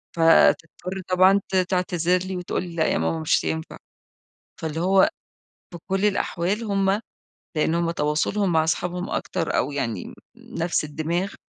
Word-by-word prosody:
فتضطر 165 +2 +3
طبعًا 185 +2 +5
ت - - -1
تعتذر 180 -1 +1
لي، 190 - -4
وتقول 180 - -3
لي: 175 -2 -8
"لأ 160 -1 +2
يا - - +1
ماما، 80 0 -1
مش 80 - +1
هينفع." 80 0 -4 0.8
فاللي 160 0 -3
هو 190 +2 +4 0.6
في 175 - -7
كل 195 +1 0
الأحوال 200 +1 0
هم 195 -1 +1 0.6
لأن 160 +1 +1
هم 170 0 +1
تواصلهم 170 +5 0
مع 160 -1 +3
صحابهم 180 +2 -2
أكتر - - -2
أو 140 - 0
يعني 115 -9 -3
ن - - -10 0.5
نفس 170 -2 0
الدماغ، 165 +6 -2
175 Hz, 150 wpm, -24 LUFS, 155-190 Hz, 0.8 s, طبعًا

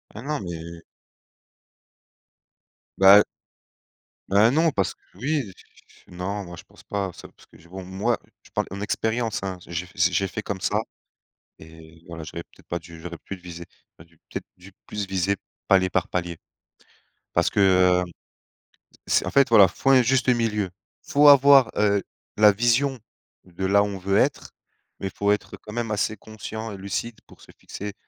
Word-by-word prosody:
Ah 105 - -7
non, 150 +3 -3
mais 85 -2 -7 2.2
Bah 95 +2 +9 1.1
Bah, 105 +4 +5
non, 160 +3 +3
parce 95 -8 -1
que - - -42 0.2
oui, 130 -1 -2 0.5
non, 95 +3 -4
moi, 85 -2 -10
je - - -11
pense - - -20
pas. 100 -2 -3
C'est - - -12
parce - - -22
que - - -20
j'ai 85 - -20
bon, 95 0 -8
moi, 100 +5 -1 0.2
je - - -19
parle - - -2
en 100 +1 -6
expérience, 110 +2 -1
hein. 95 -1 -4
J'ai 85 +1 -4
f 90 - -18
j'ai 85 +2 +3
j'ai 100 - +1
fait 110 - -5
comme 100 -2 -4
ça 105 +3 0 0.8
et 80 +1 -15
voilà, 85 -2 -8
j'aurais 85 +2 -7
peut-être - - -24
pas 85 - -2
dû, 80 0 -13
j'aurais 85 0 -7
plus 100 - -7
visé 85 -1 -9 0.3
j'aurais 80 - -16
dû 85 0 -28
peut-être - - -6
dû 90 +2 -15 0.2
plus 105 -1 -4
viser 95 +1 0 0.3
palier 95 -1 +4
par 90 -1 0
palier 90 -2 -3 1.0
parce 85 - +2
que, - - -2
heu, 90 -2 +4
c 85 - -12 1.1
c'est - - -7
en - - -3
fait, 140 -2 +4
voilà, 105 -4 +8
faut 135 +9 0
un 130 -1 +7
juste 130 +1 +2
milieu. 110 -6 0 0.3
Faut 145 +1 +4
avoir, 140 -2 +8
heu, 100 -1 +2 0.4
la 105 -1 +7
vision 120 +5 +1 0.4
de 90 +1 -6
là 100 +1 +4
où - - 0
on 100 -1 -5
veut 100 +2 0
être, - - 0 0.5
mais 95 - -3
il - - -6
faut 100 0 +1
être 105 - -2
quand 105 - -11
même 115 -2 -3
assez 105 +1 -1
conscient 110 +1 -7
et 100 - -7
lucide 100 +4 -4
pour - - -18
se - - -16
fixer 105 0 -7
100 Hz, 185 wpm, -24 LUFS, 90-110 Hz, 2.2 s, Bah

